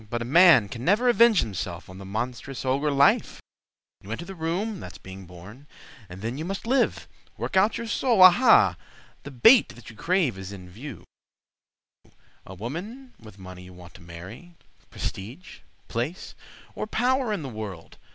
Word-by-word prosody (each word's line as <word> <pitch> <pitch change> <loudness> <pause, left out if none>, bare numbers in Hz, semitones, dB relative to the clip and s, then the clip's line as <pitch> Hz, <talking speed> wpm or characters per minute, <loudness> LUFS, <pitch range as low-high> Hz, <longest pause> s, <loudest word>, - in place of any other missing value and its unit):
But 120 0 -3
a - - -7
man 160 - +6
can 115 +4 -8
never 210 - +2
avenge 235 -4 +5
himself 90 -5 -6
On 95 +1 -12
the 95 - -10
monstrous 125 +6 -5
ogre 140 +3 0
Life. 140 0 +2 0.6
You 100 - -10
enter 165 +10 -5
the 195 - -8
room—that's 185 +4 -4
being 95 -1 -12
born; 95 +11 -14 0.4
And 90 +3 -11
then 120 +5 -4
you - - -4
must 195 +5 -5
live—work 250 -4 -3
out 200 +5 +3
your 235 - -5
soul, 225 -2 +3
Aha! 185 +8 +6 0.4
the - - -9
bait 220 - +5
that 115 -1 -13
you - - -17
crave 165 - 0
is 95 +1 -8
in 95 -2 -10
view: 110 - -10 1.4
A 95 - -10
woman 195 - -8
with 110 -3 -15
money 90 -1 -11
you 90 - -13
want 90 -1 -14
to 90 - -15
marry, 95 - -12 0.3
Prestige, 120 - -7 0.3
place, 125 +10 -4 0.4
or - - -5
power 250 +1 0
in 200 -7 -3
the - - -5
world. 105 -8 -8
130 Hz, 165 wpm, -25 LUFS, -, 1.4 s, man